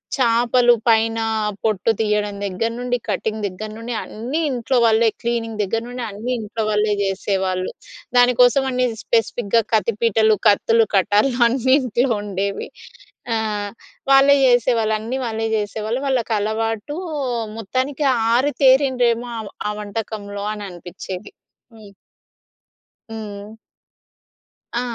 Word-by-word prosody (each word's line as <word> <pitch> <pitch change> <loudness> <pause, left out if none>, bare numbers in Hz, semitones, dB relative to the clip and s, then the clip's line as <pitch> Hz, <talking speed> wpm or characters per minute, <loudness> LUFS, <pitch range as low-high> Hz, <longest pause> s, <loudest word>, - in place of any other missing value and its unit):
చేపలు 240 -1 +4
పైనా 225 0 +3 0.4
పొట్టు 215 0 +1
తియ్యడం 210 -1 0
దగ్గర 200 +4 -1
నుండి, 245 0 -1
కటింగ్ 215 +2 -2
దగ్గర 200 +3 -7
నుండి 235 +1 -5
అన్నీ 245 +9 -4
ఇంట్లో 250 +1 0
వాళ్ళే. 225 0 +4
క్లీనింగ్ 230 -2 -2
దగ్గర 225 +3 -1
నుండి 245 0 -5
అన్నీ 215 +5 -5
ఇంట్లో 220 +1 -4
వాళ్ళే 210 0 +1
చేసేవాళ్ళు. 190 -1 -1 0.5
దాని 245 0 +6
కోసవనీ 255 +1 +4 0.2
స్పెసిఫిక్‌గా 230 -1 +1
కత్తి 220 +1 +2
పీటలు, 220 -1 +3
కత్తులు, 225 +2 +3
కటార్లు 210 +7 +2
అన్నీ 260 +2 +2
ఇంట్లో 250 +1 0
ఉండేవి. 200 0 -3 0.7
ఆ! - - +1 0.8
వాళ్లే 275 +1 +7
చేసేవాళ్ళు. 235 -3 +2
అన్నీ 230 +5 -4
వాళ్ళే 225 -1 -2
చేసేవాళ్ళు. 215 +3 -3
వాళ్ళకలవాటూ, 225 +1 -1 0.6
మొత్తానికి 260 +7 -2 0.3
ఆరితేరిండ్రేమో 260 -2 +3
ఆమ 220 - -6 0.2
ఆ - - -1
వంటకంలో 205 -1 -5
అననిపిచ్చేది. 185 - -8 0.4
హ్మ్. 215 -2 -14 1.2
హ్మ్. 210 -2 -7 1.3
ఆ! - - -1
225 Hz, 110 wpm, -20 LUFS, 210-245 Hz, 1.3 s, వాళ్లే